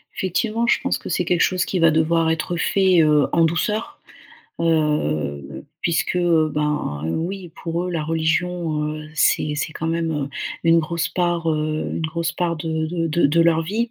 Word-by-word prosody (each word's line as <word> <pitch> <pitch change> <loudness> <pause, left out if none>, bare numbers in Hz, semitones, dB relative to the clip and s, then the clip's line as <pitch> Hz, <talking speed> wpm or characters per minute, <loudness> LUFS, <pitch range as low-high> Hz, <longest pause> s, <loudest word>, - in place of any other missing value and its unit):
Effectivement, 220 +5 -1
je - - +3
pense - - 0
que - - -9
c'est - - 0
quelque 175 -1 +1
chose 185 -1 +2
qui 185 - -2
va 165 -1 +5
devoir 160 +1 +2
être 160 +2 -1
fait, 185 0 +3
heu, 150 -2 +4
en 165 - +4
douceur, 210 - -2 0.6
heu, 75 - -1 0.2
puisque, 170 +1 0
heu, 170 -3 +3
ben 150 - -2
oui, 175 - -3
pour 170 +1 -2
eux, 180 - -3
la 165 -3 -2
religion, 165 0 -1
heu, 155 0 -8
c'est 150 -1 +2
c'est 150 - -3
quand 160 - -4
même, 165 0 -1
heu, 145 -2 -2 0.4
une 165 0 +5
grosse 170 +1 -2
part, 175 -2 0
heu, 155 0 -1
une - - -3
grosse 170 +1 -2
part 170 -1 -1
de 160 0 -2
de 165 0 -2
de 165 0 +2
de 160 +4 +2
leur 165 -1 +3
vie. 225 +8 -2
165 Hz, 185 wpm, -21 LUFS, 155-175 Hz, 0.6 s, va